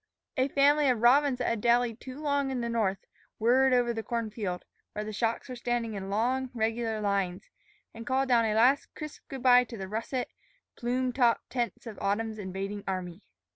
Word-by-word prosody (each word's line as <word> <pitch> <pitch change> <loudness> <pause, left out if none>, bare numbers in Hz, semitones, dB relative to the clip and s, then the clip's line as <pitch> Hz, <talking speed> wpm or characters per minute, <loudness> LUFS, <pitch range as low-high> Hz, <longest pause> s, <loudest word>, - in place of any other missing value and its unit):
A 260 -1 +2
family 285 +1 +4
of 245 -3 +2
robins 270 +2 +5
that 250 - -2
had 230 -2 -1
dallied 240 0 +2
too 260 +2 -8
long 285 -2 0
in 260 -2 -2
the 235 - -2
north 210 -5 -1 0.3
whirred 255 +4 +4
over 245 -1 +3
the 225 - -3
corn 230 -1 -3
field, 190 -5 -4 0.3
where 210 0 -4
the 215 - -5
shocks 230 +4 -1
were 255 - -6
standing 240 -2 -2
in 195 -1 -5
long, 250 +6 0
regular 225 0 -1
lines, 200 -2 -1 0.4
and 230 +1 -9
called 265 +1 +1
down 235 -3 +4
a 215 -1 0
last 255 +5 +4
crisp 305 -1 -8
good 270 -2 -7
by 250 -1 +7
to 235 - -9
the 190 -1 -5
russet, 230 +5 -3 0.5
plume 250 +1 -1
topped 240 -3 +2
tents 240 -3 -2
of 225 -3 -8
autumn's 215 +2 -1
invading 195 +1 -5
army. 185 -1 -4
235 Hz, 195 wpm, -29 LUFS, 215-255 Hz, 0.5 s, by